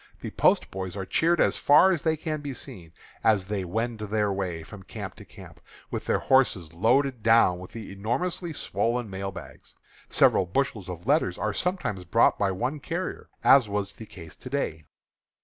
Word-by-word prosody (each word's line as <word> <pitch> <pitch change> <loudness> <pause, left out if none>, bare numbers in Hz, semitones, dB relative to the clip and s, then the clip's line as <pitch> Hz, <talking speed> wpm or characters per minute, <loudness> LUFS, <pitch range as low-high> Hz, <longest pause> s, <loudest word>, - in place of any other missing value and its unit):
The - - -6
post - - +2
boys 95 0 -5
are 95 - -4
cheered 170 - +2
as - - +2
far 150 +6 +6
as 170 -6 0
they 160 +1 +1
can 155 -1 -4
be 140 -2 -5
seen, 85 -8 -9 0.3
as 105 -4 +3
they 100 -1 -3
wend 110 +5 -3
their 105 -1 0
way 90 -4 -3
from 100 +4 -11
camp - - -7
to - - -12
camp, - - -14 0.3
with - - -4
their - - +2
horses 100 -12 +2
loaded 125 +7 +2
down 115 -5 +4
with 90 - -10
the 110 -4 -8
enormously 165 - -2
swollen 120 -6 -2
mail 95 +1 -4
bags. - - -12 0.3
Several 95 - +4
bushels 105 -2 -2
of 85 0 -7
letters 135 - +2
are 110 -1 -1
sometimes 180 - -2
brought 85 - +3
by 100 - +2
one 130 +11 -2
carrier, 175 +5 -5
as 130 -6 +6
was 100 0 -2
the 110 - -11
case 85 -5 -12
to 130 - -9
day. 80 - -3
105 Hz, 185 wpm, -26 LUFS, 95-135 Hz, 0.3 s, far